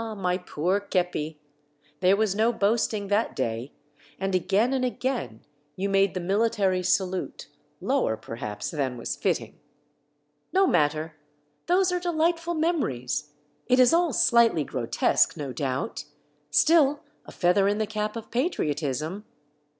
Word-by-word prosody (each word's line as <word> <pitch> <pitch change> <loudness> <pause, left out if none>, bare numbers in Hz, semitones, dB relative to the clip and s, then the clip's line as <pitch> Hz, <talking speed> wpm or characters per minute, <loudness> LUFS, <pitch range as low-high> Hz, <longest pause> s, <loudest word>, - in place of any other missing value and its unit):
my 180 -2 0
poor 180 +1 -1
kepi, 175 -6 -2 0.6
there 185 +1 +4
was 215 -2 +1
no 220 +3 +2
boasting 215 -1 0
that 205 +3 0
day, 120 +1 -3 0.5
and 195 0 -2
again 195 +7 +2
and 260 -1 0
again 245 - -3 0.3
you 195 +2 -2
made 195 -1 +2
the - - -1
military 195 0 +1
salute, 185 0 -1 0.3
lower 110 - 0
per 115 +1 -9
haps 105 -2 -5
than 135 -5 -2
was 115 - -4
fitting. - - -2 0.9
No 385 +1 +4
matter! 155 - 0 0.5
those 365 +1 +3
are 360 - 0
dehghtful 340 0 0
memories; 150 - -1 0.4
it 255 0 +3
is 250 +2 +6
all 340 -1 +3
slightly 230 - +4
grotesque, 125 -4 +1
no 140 -3 -5
doubt, 130 +1 -3 0.2
— 150 0 -41
still, 295 - +4 0.3
a - - -9
feather 195 +2 +2
in 205 +1 +1
the 215 - 0
cap 215 0 -3
of 230 - -8
patriotism. 155 - -2
195 Hz, 140 wpm, -26 LUFS, 150-240 Hz, 0.9 s, is